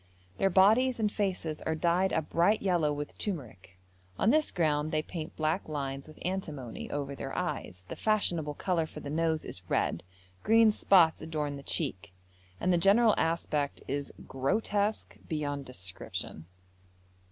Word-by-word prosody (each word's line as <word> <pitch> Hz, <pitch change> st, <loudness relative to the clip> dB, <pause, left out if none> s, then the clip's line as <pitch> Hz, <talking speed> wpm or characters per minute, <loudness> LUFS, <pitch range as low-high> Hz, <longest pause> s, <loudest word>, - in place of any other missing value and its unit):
Their 195 Hz, -, +4 dB
bodies 220 Hz, +7 st, +4 dB
and 210 Hz, -2 st, +1 dB
faces 185 Hz, -7 st, -2 dB
are 160 Hz, -, -1 dB
dyed 175 Hz, +4 st, +2 dB
a 160 Hz, -, +1 dB
bright 175 Hz, +8 st, +2 dB
yellow 175 Hz, -6 st, +2 dB
with 145 Hz, 0 st, -5 dB
turmeric; 115 Hz, -, -5 dB, 0.4 s
on 220 Hz, -, +3 dB
this 310 Hz, +1 st, +3 dB
ground 155 Hz, -3 st, +1 dB
they 155 Hz, -1 st, 0 dB
paint 160 Hz, -2 st, -6 dB
black 155 Hz, +3 st, -1 dB
lines 140 Hz, -2 st, -4 dB
with 155 Hz, -, -13 dB
antimony, 155 Hz, -10 st, -4 dB
over 140 Hz, -1 st, -3 dB
their 135 Hz, -, -6 dB
eyes; 90 Hz, 0 st, -4 dB
the -, -, -6 dB
fashionable 170 Hz, -9 st, 0 dB
colour 170 Hz, -3 st, 0 dB
for -, -, -9 dB
the 140 Hz, -, -6 dB
nose 160 Hz, 0 st, 0 dB
is 90 Hz, -1 st, -6 dB
red; -, -, +1 dB, 0.4 s
green 225 Hz, 0 st, +5 dB
spots 180 Hz, -6 st, +4 dB
adorn 150 Hz, -3 st, -3 dB
the 140 Hz, -, -8 dB
cheek, 105 Hz, -, -3 dB, 0.5 s
and 180 Hz, +1 st, +2 dB
the 175 Hz, -, +3 dB
general 210 Hz, +5 st, +5 dB
aspect 160 Hz, -3 st, -1 dB
is 140 Hz, +1 st, -3 dB, 0.2 s
grotesque 205 Hz, +10 st, -1 dB
beyond 145 Hz, -3 st, -2 dB
description. 95 Hz, -7 st, -6 dB
160 Hz, 150 wpm, -30 LUFS, 145-190 Hz, 0.5 s, green